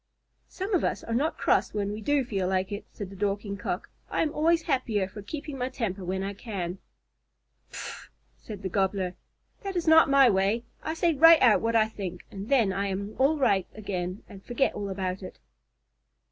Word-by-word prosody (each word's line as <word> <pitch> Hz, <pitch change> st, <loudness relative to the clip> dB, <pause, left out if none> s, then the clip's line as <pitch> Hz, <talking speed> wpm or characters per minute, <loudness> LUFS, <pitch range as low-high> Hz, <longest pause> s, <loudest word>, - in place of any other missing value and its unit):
"Some 395 Hz, +3 st, -4 dB
of 360 Hz, -, +3 dB
us -, -, -1 dB
are 230 Hz, -, -4 dB
not 285 Hz, +7 st, 0 dB
cross -, -, +1 dB
when 205 Hz, -1 st, -1 dB
we 210 Hz, +1 st, -5 dB
do 280 Hz, +4 st, +1 dB
feel 195 Hz, -5 st, -1 dB
like 190 Hz, +1 st, 0 dB
it," 205 Hz, +1 st, -5 dB
said 200 Hz, -2 st, -7 dB
the -, -, -10 dB
Dorking 200 Hz, +1 st, -2 dB
Cock. -, -, -4 dB, 0.2 s
"I -, -, +1 dB
am 310 Hz, -, -1 dB
always 330 Hz, +2 st, +2 dB
happier 215 Hz, -7 st, 0 dB
for 205 Hz, +2 st, -9 dB
keeping 280 Hz, +5 st, -6 dB
my 250 Hz, +1 st, -1 dB
temper 200 Hz, -7 st, -3 dB
when 190 Hz, +2 st, -2 dB
I 200 Hz, +1 st, -3 dB
can." 190 Hz, -4 st, -5 dB, 0.9 s
"Pffff!" -, -, -7 dB, 0.3 s
said 210 Hz, -3 st, -10 dB
the 190 Hz, -, -2 dB
Gobbler. 190 Hz, -1 st, 0 dB, 0.5 s
"That 390 Hz, -2 st, -5 dB
is 345 Hz, -2 st, -1 dB
not 320 Hz, -2 st, +7 dB
my 275 Hz, -1 st, +7 dB
way. 200 Hz, +2 st, +2 dB, 0.2 s
I 315 Hz, -, -3 dB
say 335 Hz, 0 st, +2 dB
right 325 Hz, +2 st, +8 dB
out 230 Hz, -4 st, +5 dB
what 230 Hz, 0 st, 0 dB
I 220 Hz, -1 st, +5 dB
think, 185 Hz, -5 st, -7 dB
and 200 Hz, +2 st, -7 dB
then 235 Hz, -9 st, +3 dB
I 200 Hz, +1 st, -1 dB
am 200 Hz, +2 st, -3 dB
all 285 Hz, +4 st, +4 dB
right 200 Hz, -9 st, +2 dB
again 185 Hz, -3 st, -4 dB
and 195 Hz, -1 st, -12 dB
forget 250 Hz, +2 st, 0 dB
all 205 Hz, -1 st, -4 dB
about 190 Hz, -1 st, -3 dB
it." 185 Hz, -, -9 dB
210 Hz, 200 wpm, -27 LUFS, 195-270 Hz, 0.9 s, right